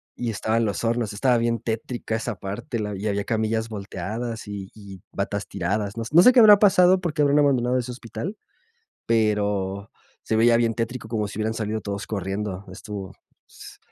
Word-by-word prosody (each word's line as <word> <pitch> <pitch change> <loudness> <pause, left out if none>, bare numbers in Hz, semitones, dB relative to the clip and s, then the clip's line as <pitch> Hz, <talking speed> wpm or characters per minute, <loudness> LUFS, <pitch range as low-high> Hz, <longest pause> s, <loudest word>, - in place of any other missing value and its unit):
y 120 -2 -2
estaban 110 +2 0
los 100 -1 -2
hornos. 115 -2 0
Estaba 120 +3 +2
bien 115 0 0
tétrica 115 0 -3
esa 115 -1 -3
parte, 105 +4 -5
la 105 -1 -3
y 100 - -6
había 100 0 0
camillas 110 0 -1
volteadas 110 +3 -5
y 100 -2 -7
y 100 -3 -11
batas 100 +1 -3
tiradas. 100 +2 -2
No 115 - -3
no 170 +4 +7
sé 250 - +9
qué 250 - +6
habrá 210 -3 +9
pasado, 185 -2 +5
por 170 -4 -2
qué 150 - 0
habrán 145 0 +4
abandonado 130 -3 +2
ese 125 0 -3
hospital, 120 - -6 0.7
pero 105 -3 0 0.3
se 110 - 0
veía 115 +1 +5
bien 115 -1 +2
tétrico, 115 0 -4
como 110 -3 -1
si 100 - -8
hubieran 110 +1 0
salido 110 -1 -3
todos 100 0 -5
corriendo. 100 -1 -3
Estuvo 95 0 -7 0.4
s - - -13
110 Hz, 185 wpm, -24 LUFS, 100-120 Hz, 0.7 s, sé